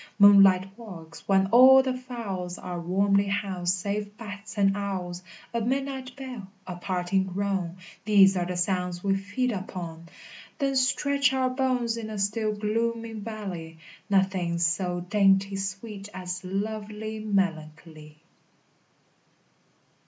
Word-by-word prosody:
Moonlight 195 -2 +6
walks, 170 -8 -11
when 195 -1 +4
all 260 +2 +8
the 260 -1 -1
fowls 210 -8 -5
Are 175 -1 -5
warmly 200 +3 +2
housed 190 -3 -1
save 205 +2 -4
bats 210 -2 -9
and 195 -1 +3
owls! 185 -3 -4 0.3
A 235 - 0
midnight 265 +1 -2
bell, 255 -7 -7 0.2
a 180 - -6
parting 185 +1 -1
groan! 190 -2 -2 0.3
These 195 -2 +6
are 175 -1 -1
the 180 -1 -3
sounds 180 -1 -1
we 195 -1 +2
feed 205 +6 -1
upon; 170 -4 -6 0.5
Then 275 -2 0
stretch 280 +1 +2
our 260 -1 +1
bones 255 -3 0
in 220 -1 -5
a 215 - -5
still 215 +2 0
gloomy 230 +2 -1
valley: 200 -7 -6 0.3
Nothing's 185 -3 +1
so 175 +1 0
dainty 195 +1 +3
sweet 195 +1 -5
as 180 0 -5
lovely 215 +3 -4
melancholy. 160 -6 -3
200 Hz, 125 wpm, -27 LUFS, 180-220 Hz, 0.5 s, all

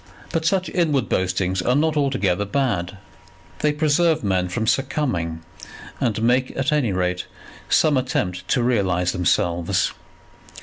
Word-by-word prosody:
But 160 -1 -1
such 185 +1 +1
inward 150 -8 +1
boastings 95 0 0
are 125 +7 +1
not 155 +2 +2
altogether 125 -10 +1
bad. 100 -5 -1 0.6
They 150 - +2
preserve 155 +1 +2
men 95 -2 0
from 110 +5 -2
succumbing, 110 - -1 0.6
and 110 -2 0
make 125 +2 +1
at 135 +3 0
any 145 -8 +1
rate 90 -1 -1 0.4
some 150 -3 +4
attempt 90 -8 -2
to 125 - +1
realize 95 -7 +1
themselves. 85 -1 0
115 Hz, 130 wpm, -22 LUFS, 90-145 Hz, 0.6 s, some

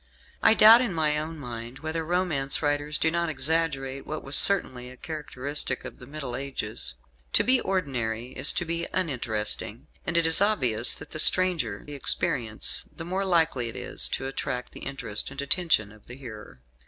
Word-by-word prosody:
I 225 - +5
doubt 225 +3 +8
in 220 -9 -3
my 150 -2 0
own 160 +1 -6
mind 120 -2 -9
whether 160 +1 -3
romance 160 -5 -1
writers 145 0 0
do 160 - 0
not 170 0 -1
exaggerate 140 -2 -2
what 155 0 -6
was 135 +1 +4
certainly 130 -11 +5
a 130 - -14
characteristic 145 -3 -4
of - - -10
the 125 - -13
Middle 140 -4 -6
Ages. 115 - -3 0.4
To - - +4
be 255 0 +2
ordinary 125 -10 -3
is 130 +2 +3
to 180 -1 -3
be 170 +1 -4
uninteresting; 115 - -2 0.2
and 170 -1 -2
it 170 - +2
is 160 +3 +3
obvious 125 - +2
that - - -11
the 155 - -5
stranger 165 - +3
the 145 - -9
experience, 115 -5 +1
the 165 - -9
more 190 +3 -3
likely 160 -9 0
is - - 0
it - - -6
to - - -7
attract 125 -2 -5
the - - -12
interest 125 -6 -1
and 135 +1 -11
attention 140 - +2
of 110 -1 -20
the 125 - -10
hearer. 110 - -12
140 Hz, 180 wpm, -25 LUFS, 125-165 Hz, 0.4 s, doubt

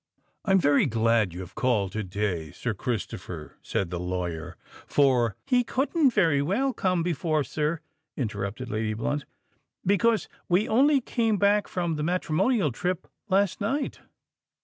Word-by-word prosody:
"I - - -5
am - - +7
very 145 -5 +4
glad 115 -3 +2
you 90 +2 -7
have 90 0 -9
called 120 -9 +1
to 110 - -2
day, 95 -4 -2
Sir 115 +9 -3
Christopher," 115 0 -5
said 90 -3 -2
the 90 - -3
lawyer; 90 -2 -4 0.3
"for——" 125 -6 +3
"He 250 -2 +3
couldn't 275 +5 +2
very 165 - +3
well 235 - +1
come 185 -6 +1
before, 160 -3 0
sir," 150 +5 -2 0.4
interrupted 110 +1 -3
Lady 110 0 -1
Blunt; 145 +6 -2 0.6
"because 220 +3 +3 0.2
we 180 +4 +3
only 275 +5 +4
came 225 -3 0
back 205 +1 +3
from 170 -3 -2
the 150 - -2
matrimonial 180 - +1
trip 180 +8 -2 0.2
last 195 +2 +2
night." 270 +8 -1
150 Hz, 150 wpm, -27 LUFS, -, 0.6 s, am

